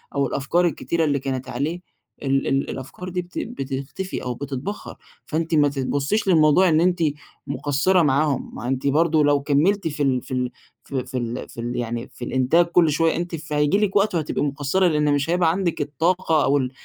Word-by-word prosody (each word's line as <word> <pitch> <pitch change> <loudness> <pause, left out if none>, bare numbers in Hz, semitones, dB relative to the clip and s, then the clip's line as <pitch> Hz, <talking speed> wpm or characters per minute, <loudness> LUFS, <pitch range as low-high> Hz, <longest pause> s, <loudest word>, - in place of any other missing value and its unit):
أو 140 -1 +2
الأفكار 165 +8 +1
الكتيرة 170 0 -1
اللي 140 -2 +1
كانت 130 -1 -4
عليه، 150 +8 -2 0.4
ال 135 0 +1
ال 135 0 0
الأفكار 160 +8 -7
دي 180 0 -2
بت 175 0 -12
بتختفي 135 +7 -5
أو 125 -1 -2
بتتبخر، 140 - -6 0.3
فأنتِ 160 +1 -1
ما 145 -1 +5
ت 140 -1 -5
تبصيش 145 +11 0
للموضوع 170 +1 +5
إن 160 +1 +3
أنتِ 180 0 +2 0.5
مقصرة 145 +6 +1
معاهم، 145 -1 +1
ما 120 - -5
أنتِ 135 +1 -1
برضه 155 +1 +3
لو 145 -1 +3
كملتِ 165 +6 +2
في 145 -1 -2
ال 130 -2 +1
في - - -8
ال 125 -1 -1 0.3
في 130 -2 -4
في 130 0 -5
ال 120 -1 -4
في 115 - -8
ال 120 +1 -3
يعني 120 0 -3
في 120 - -7
الإنتاج 130 +7 +3
كُلّ 170 -1 +3
شوية 165 +2 +2
أنتِ، 175 0 -3
فهييجي 150 +2 0
لكِ 210 -2 0
وقت 200 -2 +3
وهتبقي 155 -2 -1
مقصرة، 145 +6 +1
لإن 150 -2 +2
مش 145 +3 0
هيبقى 175 -2 +3
عندِك 175 -4 -1
الطاقة، 160 +2 +1
أو 140 +1 +3
ال 130 -2 -1
145 Hz, 195 wpm, -23 LUFS, 135-170 Hz, 0.5 s, ما